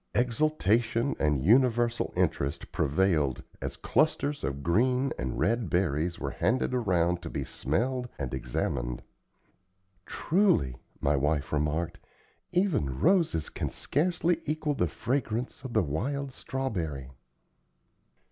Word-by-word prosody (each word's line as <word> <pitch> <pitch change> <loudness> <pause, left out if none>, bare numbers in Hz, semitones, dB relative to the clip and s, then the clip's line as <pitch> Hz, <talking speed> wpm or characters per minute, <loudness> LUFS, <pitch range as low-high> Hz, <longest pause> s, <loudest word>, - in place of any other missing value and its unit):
Exultation 120 -1 +2
and 75 -3 +1
universal 120 +1 +3
interest 80 -6 -1
prevailed 75 -3 +1 0.2
as - - -4
clusters 150 -2 +1
of 70 +1 -3
green 125 +9 +2
and 65 0 -3
red 115 -3 +1
berries 85 -1 0
were - - -3
handed 120 +8 0
around 90 -7 +1
to 85 - -6
be - - -3
smelled 125 - -1
and 65 -3 -4
examined. - - -2 1.0
"Truly," 160 - +2 0.3
my 70 +1 +2
wife 70 +1 0
remarked, 75 +3 -1 0.5
"even 175 - +1
roses 165 - +3
can - - -3
scarcely 170 +1 0
equal 155 0 0
the 90 -11 +1
fragrance 125 - -2
of 130 -3 -6
the - - +3
wild 135 - -2
strawberry." 85 - -4
105 Hz, 115 wpm, -29 LUFS, -, 1.0 s, universal